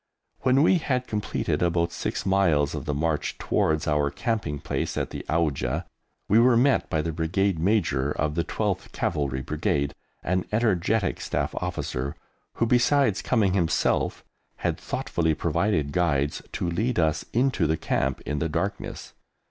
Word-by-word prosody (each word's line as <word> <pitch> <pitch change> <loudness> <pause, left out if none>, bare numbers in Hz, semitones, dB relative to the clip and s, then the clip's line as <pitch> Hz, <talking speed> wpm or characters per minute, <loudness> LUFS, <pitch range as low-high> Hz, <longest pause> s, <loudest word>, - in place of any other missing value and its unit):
When 130 +2 +3
we 175 +2 +4
had 130 -5 -1
completed 105 -3 -2
about 85 -1 +1
six - - -3
miles 85 -7 +3
of - - -5
the 75 - -1
march 80 0 -1
towards 80 -1 0
our 75 -1 +2
camping 110 - -2
place - - -3
at - - -2
the - - -6
Auja, 80 -1 0 0.4
we 110 - +5
were 120 0 +5
met 135 +3 +3
by 80 -1 0
the 85 - -2
Brigade 85 +3 0
Major 80 -8 +1
of 75 0 -1
the 85 +1 0
12th 100 -2 -2
Cavalry 70 -5 -1
Brigade, 70 0 -1 0.3
an 90 +1 0
energetic 110 -2 +1
Staff - - -2
Officer, 65 +3 -3 0.4
who, 115 - +1
besides 120 -2 +3
coming 105 -7 +2
himself, 85 -4 +1 0.3
had - - -2
thoughtfully 80 -2 -1
provided 85 -2 0
guides 75 -4 +1
to - - -2
lead 110 +9 0
us 80 -2 +2
into 120 - +2
the 80 +1 +1
Camp 65 -3 -1
in 75 0 -3
the 80 - -1
darkness. 100 +7 -4
85 Hz, 155 wpm, -26 LUFS, 75-105 Hz, 0.4 s, we